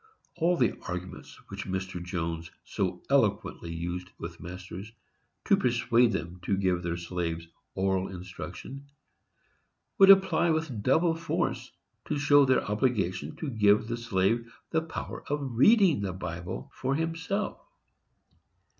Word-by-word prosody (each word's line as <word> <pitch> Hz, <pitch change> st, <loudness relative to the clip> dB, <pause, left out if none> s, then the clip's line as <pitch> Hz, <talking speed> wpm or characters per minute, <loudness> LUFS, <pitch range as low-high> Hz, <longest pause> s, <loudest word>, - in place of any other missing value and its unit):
All 175 Hz, +1 st, +2 dB
the 120 Hz, -, +1 dB
arguments 90 Hz, +1 st, -6 dB
which 100 Hz, 0 st, -6 dB
Mr. 95 Hz, -2 st, -3 dB
Jones 85 Hz, -2 st, -3 dB
so 90 Hz, -2 st, -3 dB
eloquently 105 Hz, -9 st, +1 dB
used 90 Hz, +2 st, -4 dB
with 85 Hz, 0 st, -7 dB
masters, 90 Hz, +4 st, -8 dB, 0.5 s
to -, -, +5 dB
persuade 120 Hz, -1 st, +3 dB
them 90 Hz, -3 st, -4 dB
to 95 Hz, +2 st, 0 dB
give 90 Hz, -2 st, +1 dB
their 85 Hz, -1 st, -2 dB
slaves 85 Hz, -1 st, -3 dB, 0.3 s
oral 95 Hz, 0 st, +1 dB
instruction, 95 Hz, +9 st, -8 dB, 1.1 s
would 195 Hz, 0 st, +8 dB
apply 190 Hz, -3 st, +6 dB
with 160 Hz, -9 st, -1 dB
double 165 Hz, +9 st, +3 dB
force 165 Hz, 0 st, -2 dB, 0.3 s
to -, -, -1 dB
show 145 Hz, 0 st, +5 dB
their 130 Hz, -1 st, +3 dB
obligation 105 Hz, -4 st, 0 dB
to 155 Hz, -, -4 dB
give 105 Hz, -1 st, +4 dB
the 120 Hz, -, -2 dB
slave 115 Hz, +1 st, 0 dB, 0.2 s
the 160 Hz, -, +2 dB
power 160 Hz, 0 st, -6 dB
of 145 Hz, -3 st, -2 dB
reading 185 Hz, -, +5 dB
the 95 Hz, -2 st, -2 dB
Bible 90 Hz, 0 st, -6 dB
for 135 Hz, +1 st, -1 dB
himself. 165 Hz, +6 st, -2 dB
100 Hz, 130 wpm, -29 LUFS, 90-140 Hz, 1.1 s, would